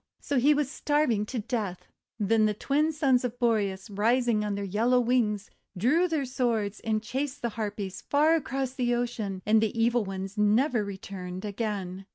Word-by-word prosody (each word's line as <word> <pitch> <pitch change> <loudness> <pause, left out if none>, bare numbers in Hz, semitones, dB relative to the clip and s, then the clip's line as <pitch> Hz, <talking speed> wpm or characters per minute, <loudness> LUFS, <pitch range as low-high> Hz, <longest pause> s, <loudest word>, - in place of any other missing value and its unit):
So 280 -3 0
he 290 +4 +5
was 295 -2 +1
starving 280 -11 +1
to 255 - -4
death. 215 -5 -3 0.3
Then 215 +1 +3
the 210 - -1
Twin 295 +8 +1
Sons 275 -5 +2
of 245 -1 -3
Boreas, 205 -6 0
rising 230 +2 +2
on 205 -1 -2
their 200 - -3
yellow 230 +6 +2
wings, 230 -4 0 0.3
drew 295 - +3
their 315 -5 -1
swords 230 -5 -1
and 215 -1 -1
chased 270 +4 -3
the 235 - +1
Harpies 205 -3 -4
far 300 +3 +3
across 270 -4 -1
the 245 -2 0
ocean; 215 -6 -3
and 215 +1 +4
the 220 +1 -1
evil 235 0 +3
ones 195 +1 -5
never 220 +3 +3
returned 190 -1 -7
again. 195 -3 -4
225 Hz, 175 wpm, -28 LUFS, 205-255 Hz, 0.3 s, he